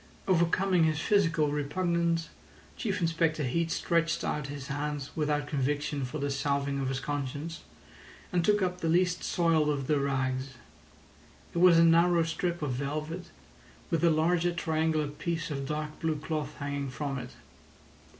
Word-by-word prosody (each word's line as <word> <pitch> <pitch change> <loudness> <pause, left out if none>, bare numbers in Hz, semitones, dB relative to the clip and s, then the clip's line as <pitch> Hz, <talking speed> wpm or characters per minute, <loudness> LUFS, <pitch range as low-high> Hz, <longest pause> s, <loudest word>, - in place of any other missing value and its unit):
Overcoming 180 0 +3
his 155 -2 +1
physical 165 -5 +2
repugnance, 170 +3 0 0.5
Chief 205 -4 -2
Inspector 165 -2 +1
Heat 165 +6 0
stretched 165 0 0
out 150 -2 -2
his 140 -1 -6
hand 145 0 -3
without 150 -2 0
conviction 145 0 -1
for 125 +5 -5
the 140 -1 -1
salving 140 0 0
of 135 -1 -1
his 135 0 -2
conscience, 145 +3 -4 0.7
and 175 -1 +2
took 205 +2 +3
up 180 0 -2
the 165 - 0
least 180 +1 +2
soiled 165 -3 +2
of 140 -2 -1
the 150 +1 +2
rags. 130 -1 -1 1.0
It 170 - -1
was 175 -1 +7
a 165 - +7
narrow 170 +1 +5
strip 170 0 -2
of 145 - -1
velvet 150 +6 -3 0.7
with 165 0 +1
a 170 - +6
larger 165 +2 +2
triangular 160 -2 0
piece 165 +2 -3
of 140 -1 -3
dark 150 0 -4
blue 160 -1 0
cloth 150 -1 -4
hanging 140 -1 -3
from 135 +1 -3
it. 125 0 -9
155 Hz, 155 wpm, -29 LUFS, 140-170 Hz, 1.0 s, was